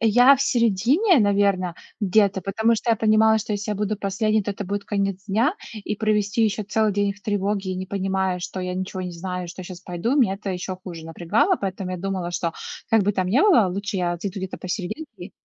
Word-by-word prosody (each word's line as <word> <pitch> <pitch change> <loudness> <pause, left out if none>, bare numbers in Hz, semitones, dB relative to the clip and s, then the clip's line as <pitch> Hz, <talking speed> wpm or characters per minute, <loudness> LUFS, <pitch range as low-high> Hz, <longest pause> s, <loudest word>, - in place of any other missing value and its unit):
Я 245 +5 +6
в - - -7
середине, 250 - +3
наверно, 200 -4 +2 0.3
где-то, 200 -1 +3
потому 220 +5 +1
что 230 +1 -1
я 225 - +3
понимала, 220 0 +4
что 215 0 -4
если 205 +1 -3
я 210 - 0
буду 210 +1 -1
последней, 215 +2 0
то 205 - -3
это 200 - -6
будет 200 +2 -3
конец 195 -2 -2
дня, 230 - +2 0.2
и 210 0 -4
провести 215 +1 +1
еще 215 -1 +1
целый 215 +1 +1
день 200 0 +1
в 205 - -20
тревоге, 200 -1 -1
и - - -3
не 185 +1 -4
понимая, 190 -1 -1
что 180 +1 -5
я 180 0 -3
ничего 185 0 -4
не 180 - -4
знаю, 180 +1 -5
что 175 - -8
я 185 - -7
щас 180 -1 -9
пойду, 185 +10 -2
меня 225 -9 +3
это 200 0 -5
еще 185 0 -4
хуже 175 -3 -9
напрягало, 175 - +1
поэтому 190 -1 -3
я 185 - -3
думала, 185 -1 -3
что, 170 -1 -2 0.4
как 225 -2 +5
бы 205 +2 +1
там 185 -1 -1
ни 245 +10 +3
было, 350 - +5
лучше 200 +2 -3
я 175 -1 0
зайду 200 +1 -4
где-то 190 0 -5
посерединке 190 - -6
200 Hz, 220 wpm, -23 LUFS, 185-215 Hz, 0.4 s, Я